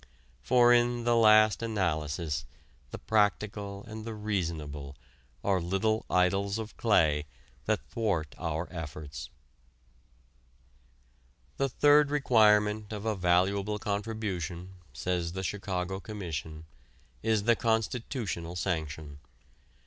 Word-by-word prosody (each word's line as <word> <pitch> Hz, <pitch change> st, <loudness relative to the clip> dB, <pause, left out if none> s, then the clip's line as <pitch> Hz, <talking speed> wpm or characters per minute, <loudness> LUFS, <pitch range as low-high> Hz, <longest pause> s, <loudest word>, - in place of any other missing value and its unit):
For 120 Hz, -, +5 dB
in 120 Hz, 0 st, +2 dB
the 120 Hz, 0 st, +3 dB
last 110 Hz, -1 st, +6 dB
analysis 80 Hz, -, -1 dB, 0.5 s
the -, -, -7 dB
practical 105 Hz, -1 st, 0 dB
and 110 Hz, -1 st, -7 dB
the 115 Hz, 0 st, -6 dB
reasonable 80 Hz, -9 st, -3 dB, 0.5 s
are 95 Hz, -3 st, +2 dB
little 105 Hz, +5 st, 0 dB
idols 100 Hz, +3 st, +2 dB
of 110 Hz, -1 st, -6 dB
clay 80 Hz, -9 st, +2 dB, 0.4 s
that -, -, 0 dB
thwart 95 Hz, -10 st, -1 dB
our 80 Hz, +1 st, -2 dB
efforts. 75 Hz, -3 st, -7 dB, 2.3 s
The 135 Hz, 0 st, +1 dB
third 145 Hz, +2 st, +5 dB
requirement 105 Hz, -6 st, +3 dB
of 105 Hz, 0 st, -5 dB
a 110 Hz, -, +1 dB
valuable 95 Hz, +3 st, +1 dB
contribution, 100 Hz, -4 st, -4 dB, 0.2 s
says 90 Hz, -2 st, -2 dB
the 95 Hz, 0 st, -4 dB
Chicago 95 Hz, -1 st, -3 dB
Commission, 80 Hz, -7 st, -6 dB, 0.6 s
is 110 Hz, -2 st, +1 dB
the 115 Hz, +2 st, +4 dB
constitutional 110 Hz, -6 st, -2 dB
sanction. 80 Hz, -4 st, -3 dB
100 Hz, 105 wpm, -29 LUFS, 85-110 Hz, 2.3 s, last